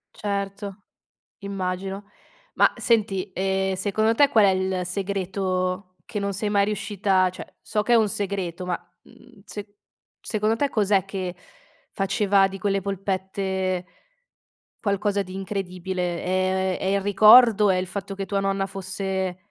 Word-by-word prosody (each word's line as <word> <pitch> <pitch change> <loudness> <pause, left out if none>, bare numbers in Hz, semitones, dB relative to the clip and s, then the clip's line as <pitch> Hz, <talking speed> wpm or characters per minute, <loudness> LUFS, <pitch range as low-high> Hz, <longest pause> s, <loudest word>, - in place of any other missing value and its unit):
Certo, 200 0 -4 0.6
immagino. 195 0 -4 0.5
Ma - - +4
senti, 205 -4 +1
ehm, 190 0 0
secondo 215 +4 +1
te 285 +3 +5
qual 220 -5 +5
è - - +5
il 190 -1 -1
segreto 185 -1 -2
che 210 - -4
non 200 0 -2
sei 205 +2 -2
mai 200 -1 +3
riuscita 200 -3 +1
cioè - - -10
so 210 - -1
che 240 - +2
è - - +7
un 220 -2 +4
segreto 190 -3 -3
ma, 180 -1 0 0.3
mhmm, 245 -5 -19
se 205 -1 -9 0.5
secondo 215 +1 0
te 280 +4 0
cos'è 200 -4 +2
che 185 -2 -4 0.6
faceva 195 -1 +2
di 195 0 -7
quelle 195 0 +1
polpette 190 -1 -2 0.9
qualcosa 200 -1 0
di 185 0 -10
incredibile, 185 -2 -3
ehm, 185 0 0
è - - -4
il 200 - +1
ricordo, 210 +1 +7
è 185 - +1
il 185 0 -2
fatto 195 +1 -5
che 195 0 -4
tua 200 - 0
nonna 195 0 0
fosse, 190 -1 -3
195 Hz, 145 wpm, -24 LUFS, 185-205 Hz, 0.9 s, è